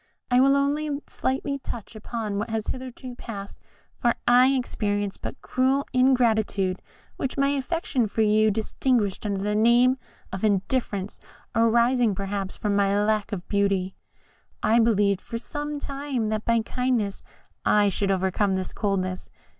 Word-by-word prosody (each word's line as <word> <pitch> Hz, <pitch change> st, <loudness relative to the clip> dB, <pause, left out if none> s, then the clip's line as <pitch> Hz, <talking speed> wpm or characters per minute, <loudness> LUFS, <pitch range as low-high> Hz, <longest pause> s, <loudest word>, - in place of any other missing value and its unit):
I 245 Hz, -, +5 dB
will 275 Hz, +1 st, +5 dB
only 290 Hz, +2 st, +1 dB, 0.2 s
slightly 275 Hz, +2 st, -2 dB
touch 235 Hz, -4 st, -7 dB
upon 215 Hz, -2 st, -4 dB
what 220 Hz, +3 st, -3 dB
has 220 Hz, -1 st, -2 dB
hitherto 255 Hz, 0 st, -6 dB
passed, 200 Hz, -5 st, -8 dB, 0.4 s
for 240 Hz, -1 st, +2 dB
I 245 Hz, +1 st, +7 dB
experienced 205 Hz, -6 st, -1 dB
but -, -, -6 dB
cruel 265 Hz, +2 st, +1 dB
ingratitude, 220 Hz, -7 st, +2 dB, 0.4 s
which 265 Hz, -, -3 dB
my 275 Hz, 0 st, +3 dB
affection 275 Hz, -3 st, -1 dB
for 220 Hz, +2 st, 0 dB
you 215 Hz, +1 st, +4 dB
disguised 220 Hz, -1 st, 0 dB
under 195 Hz, -1 st, -2 dB
the 210 Hz, +1 st, 0 dB
name 240 Hz, +4 st, +4 dB, 0.3 s
of 190 Hz, -, -5 dB
indifference, 205 Hz, -1 st, -1 dB, 0.3 s
arising, 235 Hz, 0 st, +3 dB
perhaps, 195 Hz, 0 st, -3 dB
from 205 Hz, -1 st, -1 dB
my 200 Hz, 0 st, +2 dB
lack 215 Hz, 0 st, 0 dB
of 190 Hz, -3 st, -5 dB
beauty. 200 Hz, -2 st, 0 dB, 0.7 s
I 230 Hz, +2 st, +4 dB
believed 205 Hz, -4 st, +3 dB
for 230 Hz, -, -5 dB
some 295 Hz, +4 st, -5 dB
time 275 Hz, -5 st, -3 dB
that 215 Hz, 0 st, -2 dB
by 230 Hz, -1 st, +3 dB
kindness 250 Hz, -6 st, -1 dB, 0.4 s
I 205 Hz, -1 st, +4 dB
should 195 Hz, +1 st, -1 dB
overcome 190 Hz, +1 st, +1 dB
this 185 Hz, -1 st, -3 dB
coldness. 185 Hz, -3 st, -2 dB
220 Hz, 145 wpm, -25 LUFS, 200-255 Hz, 0.7 s, I